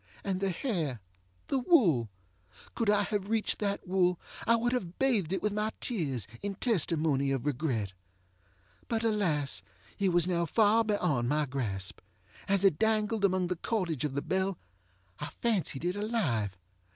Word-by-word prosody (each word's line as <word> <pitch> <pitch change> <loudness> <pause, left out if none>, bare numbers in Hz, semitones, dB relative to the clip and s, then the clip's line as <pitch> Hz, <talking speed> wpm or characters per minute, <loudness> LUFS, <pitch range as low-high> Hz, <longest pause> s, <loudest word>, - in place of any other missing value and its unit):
And 190 -2 -1
the 195 - 0
hairŌĆöthe 125 - -4
wool! 170 - +4 0.6
Could 230 -3 0
I 205 0 +4
have 205 -1 -2
reached 225 -1 +1
that 200 -2 -2
wool 180 -1 +2 0.3
I 230 - +6
would 240 +2 +1
have 185 -8 -3
bathed 225 -11 +2
it 190 - -1
with 210 -1 +1
my 210 +1 0
tears, 145 - -1 0.2
in 200 -1 -3
testimony 160 - +1
of 135 -1 -1
regret. 125 -9 -1 0.9
But 230 -1 -1
alas! 180 -11 +1 0.4
it 195 -1 +3
was 175 -1 +3
now 170 -2 +1
far 220 +4 +4
beyond 180 - +1
my 150 +1 +2
grasp. 110 -9 -3 0.5
As 195 -1 +2
it 190 -6 +4
dangled 220 -1 +1
among 185 -2 +3
the 180 +1 -1
cordage 175 - -1
of 145 -3 -2
the 140 - -1
bell, 190 0 0 0.6
I 145 - -4
fancied 190 - 0
it 180 +2 0
alive. 150 - -1
185 Hz, 155 wpm, -30 LUFS, 145-210 Hz, 0.9 s, I